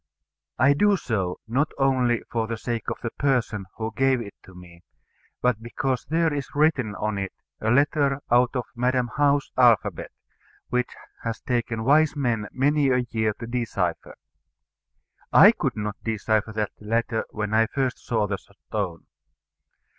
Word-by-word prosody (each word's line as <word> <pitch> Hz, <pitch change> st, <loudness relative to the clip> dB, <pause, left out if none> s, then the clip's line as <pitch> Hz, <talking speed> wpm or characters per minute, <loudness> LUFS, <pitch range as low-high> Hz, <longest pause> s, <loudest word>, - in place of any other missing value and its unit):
I 140 Hz, +3 st, +5 dB
do 205 Hz, +7 st, +3 dB
so, 95 Hz, -, -2 dB
not 135 Hz, +7 st, 0 dB
only 130 Hz, -4 st, +2 dB
for 115 Hz, -1 st, -1 dB
the 115 Hz, 0 st, -3 dB
sake 115 Hz, 0 st, -3 dB
of -, -, -3 dB
the 115 Hz, -, -2 dB
person 120 Hz, -8 st, 0 dB
who 110 Hz, 0 st, -4 dB
gave 135 Hz, -1 st, +3 dB
it 105 Hz, -4 st, -7 dB
to 95 Hz, -, -16 dB
me, 85 Hz, -1 st, -14 dB, 0.6 s
but 125 Hz, -3 st, +2 dB
because 125 Hz, +2 st, -2 dB
there 160 Hz, +2 st, +1 dB
is 145 Hz, -1 st, -5 dB
written 140 Hz, -8 st, +2 dB
on 105 Hz, -1 st, -2 dB
it 95 Hz, -1 st, -3 dB, 0.3 s
a 110 Hz, -, -1 dB
letter 140 Hz, +2 st, +2 dB
out 125 Hz, +2 st, +4 dB
of 125 Hz, -2 st, -1 dB
Madam 125 Hz, 0 st, 0 dB
How's 145 Hz, -1 st, +2 dB
alphabet, 120 Hz, -5 st, +3 dB, 0.6 s
which 125 Hz, 0 st, 0 dB, 0.3 s
has 115 Hz, -1 st, -3 dB
taken 115 Hz, -2 st, -1 dB
wise 150 Hz, +4 st, +4 dB
men 120 Hz, -7 st, -1 dB
many 145 Hz, +1 st, +2 dB
a 125 Hz, -1 st, +2 dB
year 110 Hz, -2 st, +1 dB
to 115 Hz, -, -5 dB
decipher. 115 Hz, -8 st, -2 dB, 1.2 s
I -, -, +9 dB
could -, -, -2 dB
not 105 Hz, 0 st, -4 dB
decipher 110 Hz, 0 st, 0 dB
that 105 Hz, -1 st, -2 dB
letter 115 Hz, +1 st, 0 dB
when 105 Hz, -1 st, -4 dB, 0.2 s
first 130 Hz, 0 st, -1 dB
I -, -, -23 dB
saw 110 Hz, -3 st, 0 dB
the 100 Hz, -2 st, -3 dB
stone. 100 Hz, -3 st, -6 dB
120 Hz, 155 wpm, -25 LUFS, 110-135 Hz, 1.2 s, I